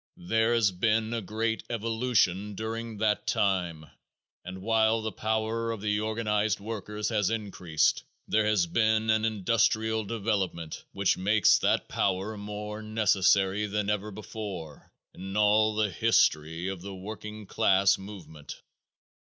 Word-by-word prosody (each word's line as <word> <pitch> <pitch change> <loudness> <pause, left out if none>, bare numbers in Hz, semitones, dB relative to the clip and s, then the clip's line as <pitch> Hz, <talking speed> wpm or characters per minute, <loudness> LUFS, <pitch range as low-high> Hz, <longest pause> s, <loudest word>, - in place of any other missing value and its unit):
There 110 +6 +1
has 110 -4 +3
been 110 +4 0
a 115 - -2
great 110 +3 -2
evolution 110 -4 0
during 115 +1 -5
that 105 0 0
time 90 -5 0 0.6
and 95 +1 -8
while 110 0 +2
the 110 - -2
power 110 +2 -1
of 115 -2 -3
the 105 0 0
organized 110 -1 0
workers 105 0 -4
has 105 -4 +1
increased 95 -8 0 0.3
there 110 -1 +2
has 105 -5 +3
been 110 +4 +2
an 110 0 +2
industrial 110 +1 +1
development 100 -7 -3
which 100 -1 +1
makes 105 +3 +4
that - - +1
power 95 +3 -1
more 105 +1 -6
necessary 105 -2 +2
than 105 0 -1
ever 105 0 -2
before 100 -7 -8 0.2
in 95 +2 -6
all 105 +1 +4
the 105 -2 +1
history 80 +1 +2
of 95 -2 -4
the 100 +1 -7
working 105 +2 -8
class 95 -2 +3
movement. 85 -7 -10
105 Hz, 135 wpm, -28 LUFS, 95-110 Hz, 0.6 s, makes